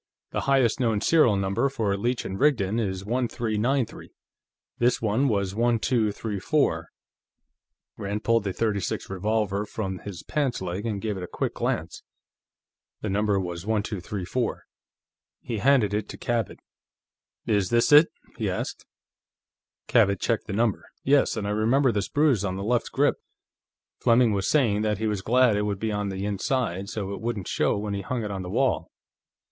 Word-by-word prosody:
The -, -, -1 dB
highest 135 Hz, -3 st, +3 dB
known 115 Hz, -4 st, +1 dB
serial 135 Hz, -4 st, +4 dB
number 100 Hz, +7 st, +1 dB
for 110 Hz, -7 st, -1 dB
a -, -, 0 dB
Leech 120 Hz, +5 st, -1 dB
& -, -, -16 dB
Rigdon 105 Hz, -1 st, +1 dB
is 95 Hz, -3 st, -2 dB
1393; 120 Hz, +1 st, -1 dB, 0.7 s
this 120 Hz, +1 st, +3 dB
one 115 Hz, +5 st, +1 dB
was 100 Hz, -5 st, 0 dB
1234." 110 Hz, -, 0 dB, 1.1 s
Rand 100 Hz, +1 st, -3 dB
pulled 115 Hz, -2 st, +2 dB
the -, -, 0 dB
.36 100 Hz, -2 st, -2 dB
revolver 100 Hz, +1 st, 0 dB
from 95 Hz, -3 st, -4 dB
his 95 Hz, -5 st, -8 dB
pants 140 Hz, -5 st, -1 dB
leg 95 Hz, +4 st, -4 dB
and 105 Hz, -2 st, -3 dB
gave 105 Hz, -3 st, -2 dB
it 90 Hz, -, -5 dB
a -, -, -5 dB
quick -, -, -3 dB
glance; -, -, -2 dB, 1.0 s
the 105 Hz, -, -2 dB
number 105 Hz, 0 st, +1 dB
was 90 Hz, -2 st, -4 dB
1234. 105 Hz, +1 st, -2 dB, 0.8 s
He 115 Hz, -3 st, -3 dB
handed 125 Hz, -5 st, +3 dB
it 105 Hz, 0 st, -2 dB
to -, -, -7 dB
Cabot. 115 Hz, -4 st, -2 dB, 0.9 s
"Is 100 Hz, -4 st, +1 dB
this 120 Hz, +3 st, +3 dB
it?" 150 Hz, +3 st, +9 dB, 0.3 s
he -, -, 0 dB
asked. -, -, -4 dB, 1.0 s
Cabot 100 Hz, -5 st, +3 dB
checked 115 Hz, -2 st, -1 dB
the 100 Hz, -, -4 dB
number. 110 Hz, -1 st, 0 dB, 0.2 s
"Yes. 140 Hz, -3 st, +3 dB
And 105 Hz, -, -2 dB
I 100 Hz, -, -1 dB
remember 120 Hz, +6 st, +3 dB
this 100 Hz, -4 st, -2 dB
bruise 145 Hz, -8 st, +2 dB
on 95 Hz, -2 st, -2 dB
the 100 Hz, -, -4 dB
left 120 Hz, +3 st, 0 dB
grip; -, -, +2 dB, 0.8 s
Fleming 120 Hz, -1 st, +4 dB
was 100 Hz, -1 st, 0 dB
saying 115 Hz, -9 st, +3 dB
that 105 Hz, -1 st, 0 dB
he 110 Hz, -, -2 dB
was 105 Hz, -3 st, -1 dB
glad 125 Hz, +1 st, +4 dB
it 105 Hz, -, +1 dB
would 105 Hz, -1 st, -1 dB
be 110 Hz, +2 st, -2 dB
on 105 Hz, -1 st, -2 dB
the 95 Hz, +1 st, -4 dB
inside, 100 Hz, -2 st, -1 dB
so 100 Hz, -3 st, -4 dB
it -, -, -7 dB
wouldn't 110 Hz, -5 st, -3 dB
show -, -, +1 dB
when 105 Hz, 0 st, -3 dB
he 100 Hz, -, -2 dB
hung 120 Hz, +4 st, -3 dB
it 105 Hz, -, -4 dB
on 95 Hz, -1 st, -4 dB
the 90 Hz, -, -6 dB
wall." -, -, +1 dB
105 Hz, 170 wpm, -26 LUFS, 100-120 Hz, 1.1 s, it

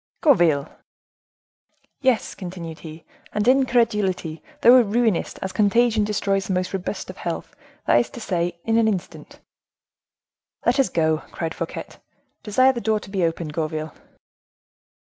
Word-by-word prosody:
"Gourville!" 170 Hz, -, +4 dB, 1.3 s
"Yes," 260 Hz, -4 st, +1 dB
continued 175 Hz, -4 st, -7 dB
he, 160 Hz, 0 st, -11 dB, 0.3 s
"and 210 Hz, +1 st, 0 dB
incredulity! 210 Hz, -10 st, +2 dB, 0.2 s
thou 250 Hz, +2 st, +8 dB
ruinest, 225 Hz, -3 st, 0 dB
as 190 Hz, -, -3 dB
contagion 220 Hz, +2 st, +3 dB
destroys 200 Hz, -2 st, 0 dB
the 190 Hz, -, -1 dB
most 185 Hz, +1 st, -1 dB
robust 190 Hz, +1 st, -4 dB
health; 175 Hz, -2 st, -5 dB, 0.3 s
that 120 Hz, -, +5 dB
is 120 Hz, -, -1 dB
to -, -, -10 dB
say, 175 Hz, -5 st, -2 dB
in 225 Hz, 0 st, +3 dB
an 225 Hz, -, +3 dB
instant." 195 Hz, -5 st, -4 dB, 1.2 s
"Let 245 Hz, +3 st, +3 dB
us 270 Hz, -, +3 dB
go," 160 Hz, -1 st, +1 dB
cried 165 Hz, 0 st, -4 dB
Fouquet; -, -, -5 dB, 0.6 s
"desire 255 Hz, +5 st, +3 dB
the 235 Hz, -, -4 dB
door 220 Hz, -1 st, +1 dB
to 195 Hz, -, -12 dB
be 190 Hz, -3 st, 0 dB
opened, 165 Hz, -2 st, -2 dB
Gourville." 155 Hz, -1 st, -3 dB
195 Hz, 135 wpm, -23 LUFS, 170-230 Hz, 1.3 s, thou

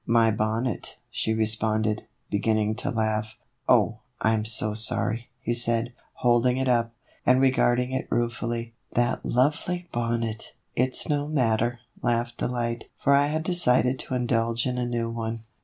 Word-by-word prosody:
" -, -, -44 dB
My 115 Hz, -1 st, +4 dB
bonnet," 110 Hz, +2 st, -2 dB
she 110 Hz, -, -1 dB
responded, 110 Hz, 0 st, 0 dB, 0.2 s
beginning 110 Hz, +1 st, +1 dB
to -, -, -3 dB
laugh. 110 Hz, -1 st, -1 dB, 0.2 s
" -, -, -15 dB
Oh, -, -, +4 dB, 0.2 s
I 110 Hz, -, +2 dB
'm 110 Hz, -1 st, 0 dB
so 110 Hz, -1 st, +2 dB
sorry," 115 Hz, +1 st, +1 dB
he 120 Hz, -, -1 dB
said, 120 Hz, 0 st, +2 dB, 0.2 s
holding 125 Hz, +1 st, +2 dB
it 130 Hz, 0 st, 0 dB
up, 115 Hz, -2 st, +1 dB, 0.3 s
and 130 Hz, 0 st, +4 dB
regarding 125 Hz, -1 st, +2 dB
it 130 Hz, 0 st, -2 dB
ruefully. 120 Hz, 0 st, -2 dB
" -, -, -26 dB
That 120 Hz, 0 st, +1 dB
lovely 160 Hz, +7 st, 0 dB
bonnet! 115 Hz, -2 st, -2 dB
" -, -, -48 dB
"It's 125 Hz, +1 st, +1 dB
no 145 Hz, -1 st, 0 dB
matter," 120 Hz, -4 st, +1 dB, 0.2 s
laughed 120 Hz, 0 st, 0 dB
Delight; 120 Hz, -1 st, -2 dB
"for 140 Hz, -, +3 dB
I 140 Hz, +1 st, +4 dB
had 155 Hz, +2 st, -1 dB
decided 130 Hz, -7 st, +2 dB
to 130 Hz, -, -4 dB
indulge 115 Hz, -1 st, 0 dB
in 125 Hz, -1 st, -1 dB
a 120 Hz, -, -1 dB
new 115 Hz, -1 st, -2 dB
one." 115 Hz, -1 st, -4 dB
120 Hz, 165 wpm, -26 LUFS, 110-125 Hz, 0.3 s, My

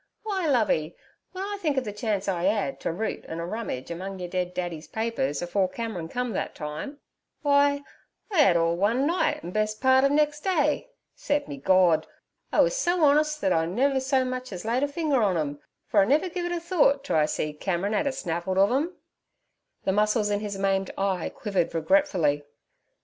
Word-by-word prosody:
W'y, 385 Hz, -5 st, -1 dB
Lovey, 180 Hz, -, +1 dB, 0.4 s
w'en 380 Hz, +2 st, -3 dB
I 405 Hz, -, -5 dB
think 300 Hz, -5 st, 0 dB
ov 265 Hz, -, +2 dB
the 210 Hz, -4 st, -5 dB
chance 205 Hz, -2 st, -2 dB
I 180 Hz, -2 st, 0 dB
'ad 210 Hz, +5 st, 0 dB
t' -, -, -2 dB
root 200 Hz, +7 st, -3 dB
an' 160 Hz, -, -5 dB
a 170 Hz, -, -3 dB
rummage 180 Hz, -, -5 dB
among 190 Hz, +3 st, -5 dB
yer 180 Hz, -1 st, -5 dB
dead 180 Hz, 0 st, -3 dB
daddy's 175 Hz, -3 st, -4 dB
papers 220 Hz, -11 st, -2 dB
afore 185 Hz, +2 st, 0 dB
Cameron 215 Hz, -7 st, -5 dB
come 250 Hz, +1 st, -2 dB
thet -, -, -3 dB
time—w'y, 280 Hz, -, -5 dB, 0.8 s
I 355 Hz, -6 st, +4 dB
'ad 180 Hz, -11 st, +5 dB
all 165 Hz, 0 st, +2 dB
one 225 Hz, +9 st, +1 dB
night, 345 Hz, +4 st, +1 dB
an' 175 Hz, -, -6 dB
best 215 Hz, +1 st, -1 dB
part 260 Hz, 0 st, +4 dB
ov 275 Hz, -, +5 dB
nex' 295 Hz, +1 st, +2 dB
day. 310 Hz, -, 0 dB, 0.3 s
Se'p 290 Hz, 0 st, -1 dB
me 140 Hz, -, -6 dB
Gord! 170 Hz, 0 st, +3 dB, 0.4 s
I -, -, +4 dB
wus -, -, +2 dB
so 355 Hz, -8 st, +1 dB
honest 300 Hz, +1 st, +3 dB
thet 190 Hz, -2 st, +2 dB
I 165 Hz, 0 st, +1 dB
never 265 Hz, +9 st, +1 dB
so 265 Hz, 0 st, +1 dB
much 255 Hz, -1 st, -4 dB
ez 185 Hz, +1 st, -7 dB
laid 235 Hz, +3 st, +1 dB
a 285 Hz, -, +2 dB
fing 300 Hz, +1 st, -2 dB
er 260 Hz, -, +4 dB
on 195 Hz, -5 st, +2 dB
'em, 145 Hz, -2 st, -2 dB, 0.3 s
fer 210 Hz, -, +2 dB
I -, -, +4 dB
never 300 Hz, -, +2 dB
giv' 350 Hz, 0 st, -3 dB
it -, -, -4 dB
a 350 Hz, -, -1 dB
thort 330 Hz, -5 st, +2 dB
t' -, -, -3 dB
I 155 Hz, -1 st, +3 dB
see 150 Hz, 0 st, -2 dB
Cameron 190 Hz, +5 st, -2 dB
'ad 215 Hz, -, +1 dB
a -, -, +1 dB
snavelled 175 Hz, -5 st, -3 dB
ov 200 Hz, +3 st, +4 dB
'em.' 310 Hz, +8 st, 0 dB, 0.9 s
The -, -, +1 dB
muscles 210 Hz, +1 st, +2 dB
in 205 Hz, -, +1 dB
his 205 Hz, -2 st, -4 dB
maimed 195 Hz, 0 st, 0 dB
eye 195 Hz, -3 st, -1 dB
quivered 195 Hz, -6 st, -2 dB
regretfully. 165 Hz, -, +2 dB
215 Hz, 205 wpm, -26 LUFS, 180-285 Hz, 0.9 s, ad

